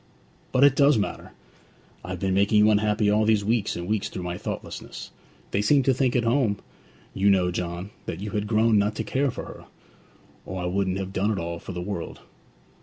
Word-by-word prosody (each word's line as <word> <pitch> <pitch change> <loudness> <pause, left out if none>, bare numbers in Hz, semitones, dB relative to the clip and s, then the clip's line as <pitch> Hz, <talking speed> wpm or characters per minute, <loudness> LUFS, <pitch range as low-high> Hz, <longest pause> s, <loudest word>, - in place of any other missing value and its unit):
'But 130 +1 +3
it 140 -2 +6
does 145 -1 +5
matter! 105 - -3 0.7
I've 90 0 -5
been 95 0 0
making 100 +2 +3
you 105 +1 +6
unhappy 105 0 +2
all 105 +1 +3
these 105 -2 +2
weeks 110 -1 0
and 85 0 -5
weeks 105 -1 -1
through 90 - -6
my 90 0 -3
thoughtlessness. - - -7 0.4
They 100 - +1
seemed 135 +5 +3
to 135 - +4
think 130 -1 +1
at 120 - +2
home, 115 -3 +2 0.6
you 100 +1 +2
know, 90 -2 +3
John, 90 +3 -4 0.2
that - - -4
you 105 +1 -5
had 105 -1 -2
grown 110 0 +3
not 105 +1 0
to 110 - -2
care 135 +6 0
for - - -6
her; - - -11 0.8
or 95 - -6
I 90 - -3
wouldn't 95 +1 0
have 95 0 -5
done 100 +3 +1
it 110 - +1
for 95 - -3
all 85 0 -4
the 90 -1 -6
world!' 90 -2 -5
105 Hz, 210 wpm, -25 LUFS, 95-110 Hz, 0.8 s, it